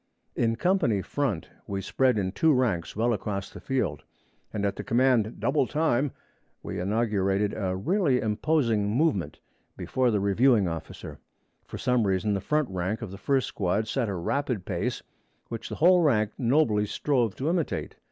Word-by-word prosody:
In 115 -1 +1
company 145 - +1
front, 125 - -2 0.2
we 100 -1 -3
spread 130 +4 +1
in 95 -2 -1
two 160 - +3
ranks 115 -10 0
well 115 +3 +1
across 100 -1 -4
the - - -10
field, 105 - -2 0.5
and 100 -1 -2
at 100 -1 -1
the - - -6
command 120 -2 +2
'Double 135 -1 +1
time!' 150 -3 +1 0.5
we - - -5
inaugurated 100 0 0
a 95 -3 -2
really 140 - +1
imposing 110 -2 +1
movement, 110 - 0 0.4
before 130 -1 0
the 105 -3 +1
reviewing 100 +1 +3
officer. 80 -2 -7 0.5
For - - -8
some 125 -4 +1
reason 95 +2 +1
the 100 - -1
front 150 +6 0
rank 95 +5 -2
of 105 - -6
the 95 - -9
first 135 +4 +1
squad 100 +3 -1
set 120 -1 -1
a 100 - -2
rapid 120 +2 -2
pace, - - -2 0.5
which 115 -1 -6
the - - -4
whole 180 +2 +5
rank 110 -9 +2
nobly 115 -5 +2
strove 120 -4 0
to 135 - -3
imitate. 170 -1 -1
115 Hz, 165 wpm, -27 LUFS, 100-135 Hz, 0.5 s, whole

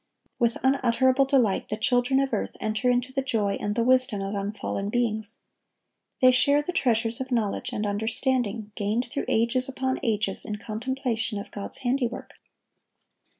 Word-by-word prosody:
With 235 -1 +2
unutterable 260 0 +3
delight 255 -8 +2
the 215 - -2
children 245 +3 +2
of 275 -2 0
earth 210 - -2
enter 215 +3 0
into 250 +1 0
the 270 - 0
joy 215 -6 0
and 205 0 -1
the 230 - +2
wisdom 255 -3 +3
of 195 +1 -3
unfallen 200 0 -3
beings. 220 -2 -1 0.8
They 255 0 +8
share 285 +3 +3
the 360 - -3
treasures 230 -7 +1
of 260 - -4
knowledge 220 -5 -1
and 210 - -2
understanding 220 +1 -1
gained 215 +4 -1
through - - -2
ages 235 +3 +1
upon 260 0 -1
ages 215 -5 -1
in 210 - -4
contemplation 230 +1 -3
of 200 - -7
God's 200 - -5
handiwork. 245 -1 -1
235 Hz, 155 wpm, -26 LUFS, 215-260 Hz, 0.8 s, They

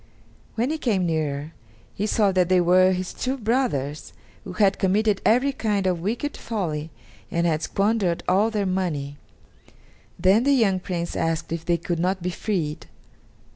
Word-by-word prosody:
When 240 +6 0
he 315 - -2
came 200 -9 +1
nearer, 155 -2 -2 0.4
he 210 - -2
saw 210 -2 +2
that 185 -2 +2
they 185 -1 +4
were 185 +2 +5
his 185 0 -3
two 260 +2 -2
brothers, 210 - -1 0.3
who 185 - -8
had 195 0 +2
committed 200 +2 +2
every 250 +5 +3
kind 210 -6 -1
of 180 -3 0
wicked 235 - -2
folly 165 -9 -3 0.4
and 170 0 0
had 160 -2 +1
squandered 195 -4 0
all 205 +4 +3
their 210 -3 -1
money. 165 -7 -2 1.0
Then 195 +5 +4
the 280 +1 +3
young 205 -8 +3
Prince 175 -2 -4
asked 165 -1 -1
if 165 0 -4
they 170 -1 +2
could 170 0 -3
not 185 +1 -1
be 180 - -1
freed. 170 -6 -3
185 Hz, 165 wpm, -24 LUFS, 170-215 Hz, 1.0 s, were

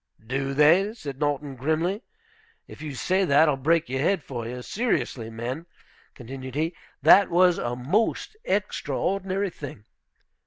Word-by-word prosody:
"Do 135 +3 -2
they?" 175 +9 +5
said 140 - -7
Norton, 145 -2 -1
grimly. 160 - 0 0.7
"If - - -12
you 150 -3 -5
say 185 +8 +1
that, 155 -2 +5
I'll 150 - +3
break 160 +5 +2
your 130 +1 -2
head 170 +3 +1
for 120 -3 -5
you. 125 +1 -6
Seriously, 165 - -1
men," 125 +9 -5 0.5
continued 130 +1 -8
he, 160 +3 -1 0.3
"that 185 +5 +7
was 180 0 +4
a 120 0 -2
most 200 - 0
extraordinary 195 - -1
thing. 135 -10 -9
150 Hz, 145 wpm, -25 LUFS, 130-185 Hz, 0.7 s, that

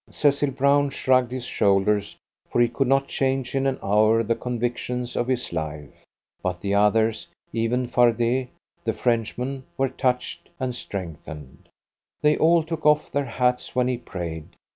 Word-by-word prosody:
Cecil 145 -1 +2
Brown 140 +2 +3
shrugged 130 -2 +2
his 130 -1 -4
shoulders, 100 -1 +1 0.3
for - - 0
he 120 - +5
could 125 +3 -1
not 135 +1 +2
change 135 -1 -1
in 135 0 +1
an 135 -1 0
hour 110 +3 +3
the 115 +1 +1
convictions 125 +1 -3
of 120 - 0
his 125 -7 -1
life; 75 -3 -5 0.5
but 90 -1 -2
the 100 +2 -2
others, 110 +2 +2 0.3
even 115 +3 0
Fardet, 120 +1 +2 0.4
the - - 0
Frenchman, 125 +3 -1
were 135 0 +1
touched 125 -1 -2
and 130 -1 -2
strengthened. 80 - -8 0.5
They 150 0 +5
all 165 +1 +4
took 160 0 -5
off 150 0 +3
their 145 0 0
hats 125 -1 -1
when 125 0 +2
he 125 -1 0
prayed. 85 -8 -7
125 Hz, 155 wpm, -24 LUFS, 105-135 Hz, 0.5 s, he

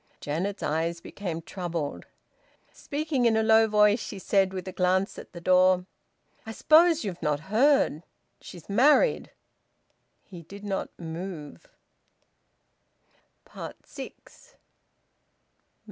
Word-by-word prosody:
Janet's 180 +7 -3
eyes 165 +3 -1
became 170 -2 -6
troubled. 170 -5 -5 0.7
Speaking 290 -4 -1
in 225 -1 +2
a 220 - +2
low 220 0 +5
voice 210 +1 +4
she 205 - -7
said, 195 0 +1
with 185 -1 -6
a - - -4
glance 185 +1 0
at - - -12
the 175 - -9
door 185 +1 +3 0.6
"I 220 - -7
suppose 325 +5 +4
you've 185 -4 -5
not 150 -1 -1
heard. 265 - +3 0.4
She's 175 -3 -12
married." 285 - +3 0.9
He 180 -4 -11
did 200 +5 -12
not 195 -2 -3
move. 165 -2 -8 2.2
SIX. - - -12
190 Hz, 110 wpm, -27 LUFS, 170-220 Hz, 2.2 s, low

